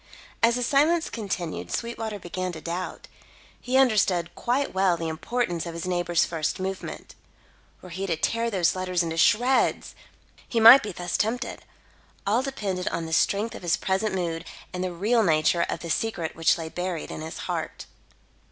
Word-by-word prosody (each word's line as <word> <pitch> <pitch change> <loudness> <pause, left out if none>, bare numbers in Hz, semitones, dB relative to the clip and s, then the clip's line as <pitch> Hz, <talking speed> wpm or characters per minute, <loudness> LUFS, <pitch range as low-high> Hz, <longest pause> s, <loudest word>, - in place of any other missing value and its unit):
As 230 +1 +4
the 250 - -1
silence 310 +6 +2
continued, 190 -7 -4
Sweetwater 225 -2 -3
began 185 0 -4
to 160 - -7
doubt. 175 +3 -5 0.5
He 255 +1 +1
understood 190 -9 +3
quite 260 +4 -1
well 190 -2 +2
the 165 0 -3
importance 175 +1 -2
of 165 - -6
his 170 - -4
neighbour's 175 -2 +1
first 160 0 -2
movement. 190 0 -5 0.7
Were 180 - -10
he 190 +3 -4
to 170 - +1
tear 230 +8 0
those 185 -6 +1
letters 185 -1 0
into 165 -1 -3
shreds! 235 +8 +3 0.6
He 235 - +1
might 230 +5 +10
be 210 - -5
thus 175 -1 -3
tempted. 225 +4 -2 0.6
All 215 +5 +2
depended 200 -9 -3
on 165 - -2
the 160 - -5
strength 205 +7 +2
of - - -8
his 175 -2 +1
present 190 +2 -1
mood 170 -2 -2 0.3
and 180 0 -3
the 185 - -2
real 215 +7 +2
nature 170 -2 +2
of - - -3
the 170 - -6
secret 175 -7 -2
which 165 +1 +3
lay 165 -1 -5
buried 180 -1 -4
in - - -6
his 160 +1 -6
heart. - - -4
185 Hz, 175 wpm, -26 LUFS, 170-230 Hz, 0.7 s, might